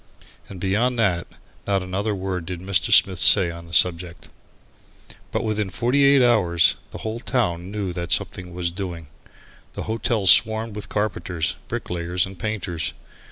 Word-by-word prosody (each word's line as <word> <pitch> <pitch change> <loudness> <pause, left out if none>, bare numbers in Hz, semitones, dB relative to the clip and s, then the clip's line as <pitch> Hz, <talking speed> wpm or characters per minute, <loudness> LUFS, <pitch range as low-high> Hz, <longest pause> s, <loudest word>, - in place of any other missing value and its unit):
And 95 - -9
beyond 110 +7 0
that, 95 -6 0 0.4
not 100 -2 0
another 100 +3 -2
word 95 -3 -4
did 90 -2 -5
Mr. 95 +1 0
Smith 95 -2 +5
say 90 -3 +6
on 85 0 -10
the - - -14
subject. 85 0 +1 1.0
But - - -2
within 105 -2 -2
forty 125 +8 +1
eight 140 -1 +5
hours 90 -9 +3 0.2
the - - -9
whole 110 +1 -3
town 95 -9 -2
knew 100 -3 -4
that 85 -1 -5
something 90 -1 -1
was 85 -1 -2
doing. 85 -4 -7 0.6
The - - -5
hotel 110 -1 -2
swarmed 110 +3 +5
with 105 - -7
carpenters, 95 -4 -2
bricklayers 90 -6 -2
and 95 -2 -12
painters. 95 -6 -3
95 Hz, 155 wpm, -22 LUFS, 90-110 Hz, 1.0 s, say